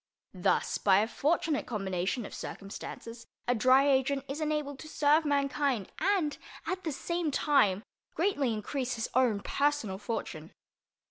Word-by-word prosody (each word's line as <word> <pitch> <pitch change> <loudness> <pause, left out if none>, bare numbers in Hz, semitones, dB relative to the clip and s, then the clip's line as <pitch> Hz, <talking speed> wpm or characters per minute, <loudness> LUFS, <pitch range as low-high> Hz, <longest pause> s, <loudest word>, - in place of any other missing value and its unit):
Thus, - - +1
by 190 -2 +5
a 220 - 0
fortunate 305 +3 0
combination 195 +1 -2
of - - -9
circumstances, 230 +3 -8 0.2
a 245 - +4
Dry 255 +4 +5
Agent 275 0 +2
is 285 +4 -4
enabled 300 -3 -2
to 310 - -9
serve 305 +1 +3
mankind 280 -6 0
and, 370 -7 +1 0.3
at 370 0 -3
the 320 - -2
same 340 +3 -2
time, 230 -9 +3 0.3
greatly 315 - +1
increase 245 +4 -2
his 225 0 -3
own 235 -5 +3
personal 280 -10 0
fortune. 220 +2 -5
275 Hz, 140 wpm, -30 LUFS, 225-295 Hz, 0.3 s, by